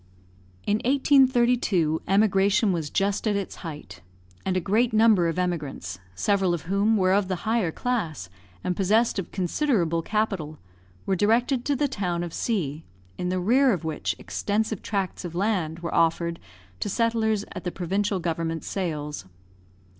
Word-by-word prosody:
In 205 - +2
1832 245 - +3
emigration 200 +1 +3
was 165 -4 -2
just 200 +5 0
at 210 - +2
its 200 -2 -4
height, 150 - -8 0.4
and 185 -1 0
a - - +3
great 220 +6 +1
number 215 -5 +5
of 165 - -2
emigrants, 150 - -3 0.2
several 195 - +2
of 160 - -7
whom 200 +5 +2
were 185 -1 +3
of 200 -1 +2
the 185 +2 -4
higher 220 -6 +1
class, 165 - -2 0.4
and 180 - -1
possessed 210 +4 +2
of 190 - -5
considerable 180 - 0
capital, 195 -7 -2 0.5
were 195 - +1
directed 240 +6 +2
to 290 - +1
the 290 +2 +1
town 180 -9 -2
of 170 -2 -6
C, 165 - -2 0.4
in 180 - -1
the 185 0 0
rear 250 +8 +4
of 180 -6 -1
which 160 -1 -2
extensive 215 0 -2
tracts 195 -3 -3
of 170 -2 -6
land 175 -5 -1
were 170 - -4
offered 170 0 +1 0.4
to - - -2
settlers 220 -1 +1
at 185 - -7
the 180 - -2
provincial 195 +3 -1
government 165 -1 -2
sales. 150 - -4
195 Hz, 155 wpm, -25 LUFS, 170-220 Hz, 0.5 s, number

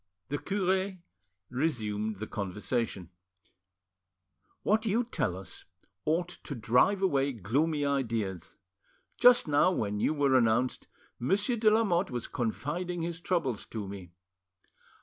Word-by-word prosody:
The 145 +1 -2
cure 190 0 0 0.6
resumed 110 -7 -1
the 105 +3 -5
conversation. 100 -2 -3 1.5
"What 215 +1 +2
you 225 +4 +2
tell 130 - -2
us 95 - -8 0.4
ought 170 +3 +1
to 140 - -5
drive 125 - +3
away 140 -6 +2
gloomy 145 - 0
ideas. 115 - -2 0.6
Just 245 -6 +7
now, 145 +3 +4
when 105 - -1
you 155 - +1
were 140 -2 +2
announced, 120 +1 +2 0.3
Monsieur 200 - +2
de 220 -1 +5
Lamotte 200 -4 +2
was 120 -2 -4
confiding 165 +9 -3
his 170 0 -4
troubles 155 - -1
to 105 -3 -5
me. 95 -3 -9
140 Hz, 120 wpm, -30 LUFS, 110-180 Hz, 1.5 s, Just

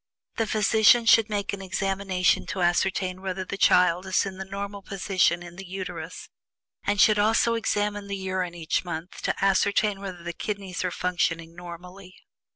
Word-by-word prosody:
The 225 - 0
physician 220 +2 +4
should 225 -1 +5
make 205 -2 -2
an 200 - -5
examination 195 -1 0
to 185 -2 -2
ascertain 185 +1 0
whether 190 -1 -4
the 200 - -5
child 180 -1 +3
is 190 - +2
in 190 -1 -7
the 190 - -5
normal 200 +1 -6
position 185 -3 0
in 175 0 -11
the 195 - -7
Uterus, 180 -3 -6 0.6
and 205 0 0
should 210 0 +5
also 225 +2 +3
examine 205 -2 -1
the 200 0 -3
urine 185 -2 -3
each 165 -2 -1
month 170 0 -6
to - - -1
ascertain 200 +1 +2
whether 185 -3 -7
the 170 0 -4
kidneys 195 -1 -4
are 180 - 0
functioning 170 -2 -2
normally. 180 +2 -11
190 Hz, 165 wpm, -26 LUFS, 180-200 Hz, 0.6 s, should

